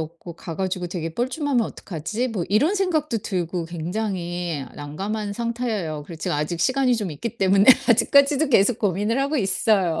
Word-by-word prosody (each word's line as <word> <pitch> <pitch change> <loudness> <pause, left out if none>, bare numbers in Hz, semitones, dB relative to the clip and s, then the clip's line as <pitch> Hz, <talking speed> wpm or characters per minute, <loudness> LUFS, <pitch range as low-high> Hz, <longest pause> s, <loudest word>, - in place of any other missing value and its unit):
없고 170 +2 -7
가 165 -1 -7
가지고 185 -1 -2
되게 165 -2 -5
뻘쭘하면 260 +1 0
어떡하지?' 210 +10 -4
뭐 200 -7 -3
이런 275 - +3
생각도 310 - 0
들고 180 -3 -3
굉장히 175 -3 -3
난감한 200 +8 -4
상태예요. 225 -9 -3
그리고 165 -3 -9
지금 150 - -1
아직 150 +3 -2
시간이 260 -2 +2
좀 205 -6 -3
있기 230 +11 -6
때문에 195 +1 +4 0.2
아직까지도 280 +5 +4
계속 230 -1 +4
고민을 210 +5 0
하고 280 +3 0
있어요. 195 - +1
200 Hz, 390 characters per minute, -23 LUFS, 170-240 Hz, 0.2 s, 때문에